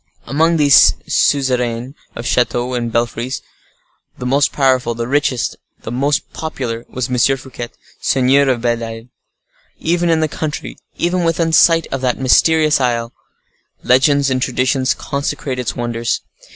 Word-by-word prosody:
Among 160 +6 +2
these 145 -3 +6
suzerains 125 -2 0 0.2
of 115 - -6
chateaux 125 0 0
and 120 -2 -2
belfries, 120 +3 -2 0.7
the 125 - -6
most 140 +3 +2
powerful, 130 -4 +1
the 115 0 -3
richest, 140 -2 0 0.3
the - - -6
most 140 +4 -1
popular, 125 -7 -5
was 125 -1 -3
M. 130 +1 +2
Fouquet, 125 -2 -8 0.3
seigneur 135 +1 +3
of 125 -3 0
Belle 120 -1 0
Isle. 115 +1 -8 0.7
Even 170 +1 0
in 165 -1 +3
the 155 - +1
country, 150 0 -5 0.2
even 175 +1 0
within 165 0 0
sight 165 0 +5
of 135 - -3
that 125 -2 0
mysterious 155 +3 +3
isle, 120 -1 -1 0.7
legends 140 +2 +3
and 130 0 0
traditions 130 +1 0
consecrate 140 -2 -4
its 125 - -3
wonders. 120 -1 -2
130 Hz, 140 wpm, -17 LUFS, 120-145 Hz, 0.7 s, these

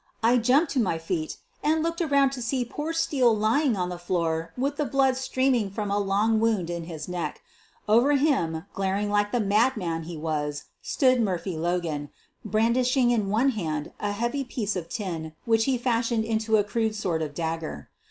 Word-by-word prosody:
I 235 +2 +5
jumped 260 +7 +3
to 270 - 0
my 190 -8 +1
feet, 165 -1 -3 0.2
and 315 +1 +2
looked 335 +1 -1
around 280 -4 +3
to 265 -2 -5
see 245 +1 -1
poor 295 +6 -4
Steele 265 -8 +2
lying 235 +5 +2
on 180 -1 -1
the 180 -1 -6
floor 165 -2 -1
with 280 +3 -1
the 300 - +1
blood 270 -1 +2
streaming 260 -4 +1
from 205 +1 -3
a 205 - +1
long 205 +3 +2
wound 215 -7 +1
in 170 -1 -4
his 160 -3 -6
throat. 180 -1 -3 0.5
Over 240 +7 +5
him, 230 - +1
glaring 195 +2 -1
like 205 0 +1
the 245 - +1
madman 205 -6 +1
he 170 -1 -6
was, 150 -2 -2 0.2
stood 255 -2 +2
Murphy 185 -3 -1
Logan, 160 -3 -2 0.3
brandishing 240 +4 +2
in 215 -5 +1
one 230 +7 +3
hand 160 - -3
a 205 - -1
heavy 240 +7 -1
piece 225 -5 -3
of 170 -2 -4
tin 165 -6 -4
which 225 -1 +3
he 270 - +2
had 245 - -2
fashioned 230 -2 +1
into 220 0 +1
a 205 - +3
crude 220 +1 -1
sort 180 -6 -1
of 150 -2 -4
dagger. 160 - -4
215 Hz, 190 wpm, -26 LUFS, 175-250 Hz, 0.5 s, I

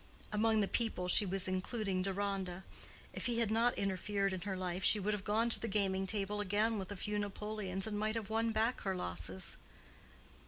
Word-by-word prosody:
Among 220 +1 +3
the 200 - +1
"people" 220 -6 -1
she 195 +3 +4
was 190 0 +2
including 185 +1 -1
Deronda. 190 -1 -2 0.5
If - - -2
he 240 -1 0
had 230 -2 +1
not 230 +2 +2
interfered 195 0 0
in 185 - -4
her 190 0 -3
life 185 0 -3
she 215 - +8
would 205 +2 0
have 205 -2 -3
gone 220 +3 +2
to - - +4
the 230 - -3
gaming 195 -2 0
table 205 0 -1
again 210 +2 +1
with 190 +1 -6
a - - -4
few 210 +2 -2
napoleons, 205 -2 -3
and 210 -1 -3
might 215 +1 0
have 220 -3 -3
won 225 +1 +1
back 225 +3 +1
her 190 -1 -1
losses. 90 - -2
205 Hz, 200 wpm, -35 LUFS, 190-215 Hz, 0.5 s, she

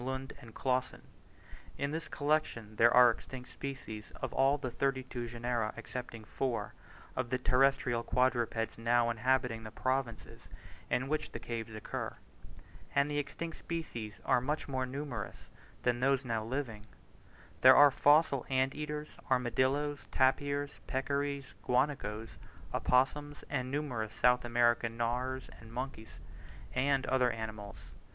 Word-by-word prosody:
Lund 130 +1 -4
and 115 -2 -13
Clausen. 130 -1 -1 0.7
In 140 0 -1
this 160 +1 -3
collection 145 -8 -1
there 120 +1 +6
are 125 -1 +8
extinct 125 +2 -8
species 120 -6 -6
of - - -3
all 135 +2 +4
the 130 -3 -4
thirty 135 +1 0
two 120 -2 -5
genera, 120 -2 -2
excepting 115 0 -6
four, 120 +2 -2 0.4
of 130 -2 -2
the 130 - +1
terrestrial 125 -1 +3
quadrupeds 120 -3 0
now 120 0 +3
inhabiting 125 0 +1
the 110 - -7
provinces 130 0 -3 0.4
in 130 +2 +1
which 155 +2 -2
the - - -4
caves 115 -2 -5
occur; 110 - -4 0.8
and 140 +1 +3
the 145 - +1
extinct 160 +3 -5
species 120 -11 -5
are 125 - +4
much 150 +4 -2
more 130 -2 -1
numerous 130 -6 -6 0.3
than 120 -1 +2
those 135 +1 +2
now 115 -2 -1
living: 115 -3 -4 0.7
there 130 0 +9
are 145 -1 +8
fossil 145 -2 +4
ant 130 0 +2
eaters, 150 0 -4 0.2
armadillos, 130 +3 +1
tapirs, 140 +2 +1
peccaries, 140 +1 -2
guanacos, 125 -4 -1 0.3
opossums, 145 +3 +1
and 130 -3 -1
numerous 130 -7 -2
South 125 0 +4
American 120 -1 +2
gnawers 125 +2 -1
and 110 0 -13
monkeys, 125 -2 -6 0.6
and 135 +1 +2
other 130 -1 +3
animals. 110 -3 -5
130 Hz, 135 wpm, -33 LUFS, 115-140 Hz, 0.8 s, there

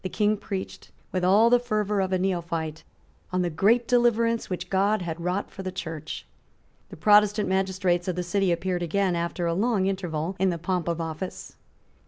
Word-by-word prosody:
King 210 0 +2
preached, 195 -2 -6 0.2
with 185 -1 -1
all 210 +6 +5
the 245 - +6
fervour 210 -4 0
of 190 0 -1
a 185 - +2
neophyte, 170 -4 -2 0.5
on 185 0 +1
the 175 - -1
great 225 +9 +3
deliverance 230 -1 +2
which 180 -1 -5
God 195 +1 +2
had 170 -1 -5
wrought 180 +3 -2
for - - -8
the 185 -1 -4
Church. 165 -4 -6 0.6
The - - -10
Protestant 210 +3 +4
magistrates 190 -2 0
of 180 - -1
the 180 - -2
city 190 +1 +1
appeared 175 +1 -1
again, 185 +2 +1
after 170 +1 -2
a 170 - +1
long 205 +1 +1
interval, 180 -3 -2
in 190 0 +3
the 170 - -1
pomp 180 0 -2
of 170 -1 -1
office. 165 +3 -6
185 Hz, 185 wpm, -26 LUFS, 175-205 Hz, 0.6 s, the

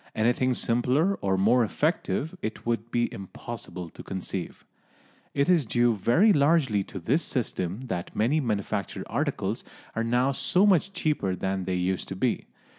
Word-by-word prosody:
Anything 125 +3 +2
simpler 125 +12 +2
or 95 -1 +1
more 115 +6 +4
effective 155 - -1
it 110 - -5
would 115 -1 -1
be 120 0 0
impossible 95 -2 -7
to - - -10
conceive. 95 -1 -5 0.7
It 140 0 +2
is 175 -4 +4
due 120 0 +2
very 160 - +4
largely 140 -8 +3
to - - -9
this 120 - +1
system 105 - -2
that 90 -7 -4
many 125 +9 +2
manufactured 105 -8 -2
articles - - -2 0.3
are 115 - 0
now 125 +3 +2
so 180 +8 +2
much 195 -1 +3
cheaper 150 - 0
than 95 0 -2
they 95 0 -1
used 90 +1 -1
to 95 - -5
be. 120 +5 -1
120 Hz, 155 wpm, -27 LUFS, 95-140 Hz, 0.7 s, more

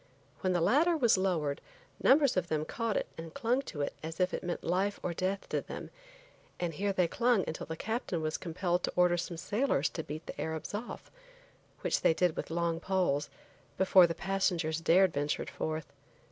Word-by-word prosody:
When 185 -2 +1
the 175 - +1
ladder 320 - +4
was 240 -6 +4
lowered, 170 -7 0 0.4
numbers 280 0 +5
of 180 -2 0
them 155 -2 -1
caught 230 +1 -1
it - - 0
and 165 -1 -8
clung 250 0 +1
to 155 - -6
it 145 - -1
as 165 +2 -6
if 180 0 +2
it - - -3
meant 175 -1 -3
life 190 +4 0
or 175 - -1
death 190 +3 -2
to - - 0
them, - - -8 0.7
and 175 -2 -1
here 200 +5 0
they 185 -3 +2
clung 235 +1 +2
until 160 - -5
the 160 +1 -5
captain 220 -4 -2
was 155 0 -1
compelled 175 +1 -1
to - - -2
order 180 -1 +4
some 170 0 -4
sailors 185 - +1
to 160 - -5
beat 155 +2 -7
the - - -6
Arabs 160 +3 -4
off, 220 +4 -6 0.7
which - - 0
they 160 - +4
did 180 -2 +2
with - - -4
long 165 0 0
poles, 175 -6 0 0.5
before 185 -1 +6
the 165 - -3
passengers 175 -4 0
dared 180 +2 +4
venture 145 +1 -1
forth. 155 0 -4
180 Hz, 195 wpm, -31 LUFS, 160-195 Hz, 0.7 s, before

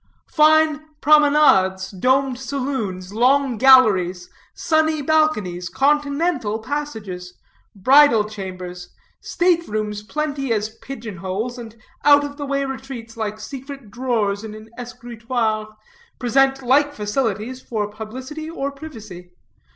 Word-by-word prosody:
Fine 310 -1 +4 0.2
promenades, 285 -12 +4
domed 255 +5 +1
saloons, 255 -9 -4
long 255 +1 +2
galleries, 195 -9 +5 0.2
sunny 315 -1 +1
balconies, 210 - +1
confidential 290 -4 0
passages, 220 -9 -6 0.4
bridal 235 0 +5
chambers, 185 -3 -8 0.3
state 345 -1 +1
rooms 210 -1 -3
plenty 280 +2 -3
as 215 -1 0
pigeon 230 -7 -8
holes, 205 +7 -4
and 225 -2 -10 0.3
out 290 0 +6
of 285 0 -6
the 285 -2 -5
way 275 0 -1
retreats 265 -4 -7
like 215 -1 -4
secret 270 0 -9
drawers 220 -5 -1
in 215 -1 -7
an 215 +1 -13
escritoire, 235 -2 -3 0.5
present 270 +2 +2
like 285 +3 +3
facilities 220 +2 -2
for 215 -5 -3
publicity 255 +9 -8
or 280 -4 -3
privacy. 220 - -11
245 Hz, 110 wpm, -21 LUFS, 210-280 Hz, 0.5 s, out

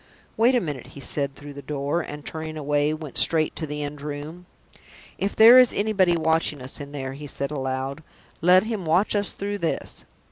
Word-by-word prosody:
"Wait 240 +4 +4
a - - +4
minute," 145 - -5
he - - -7
said, 140 0 -3
through 145 +1 -10
the 140 - -9
door, 145 +4 -2
and, 150 -2 -8
turning 160 0 -6
away, 145 0 +1
went 155 -2 -4
straight 160 -2 +2
to 160 - -3
the 150 0 -4
end 145 0 -6
room. 150 +4 -7 0.7
"If 200 - -1
there 230 +3 +9
is 255 -2 +7
anybody 195 -5 +2
watching 160 -2 +1
us 130 +3 -6
in 140 0 -8
there," 135 -2 -5
he 145 +2 -8
said 140 +1 -4
aloud, 135 0 -3 0.4
"let 180 +3 +6
him 220 -3 -3
watch 175 +7 +2
us 205 0 +2
through 205 +1 -4
this!" 165 - -3
155 Hz, 200 wpm, -24 LUFS, 145-180 Hz, 0.7 s, there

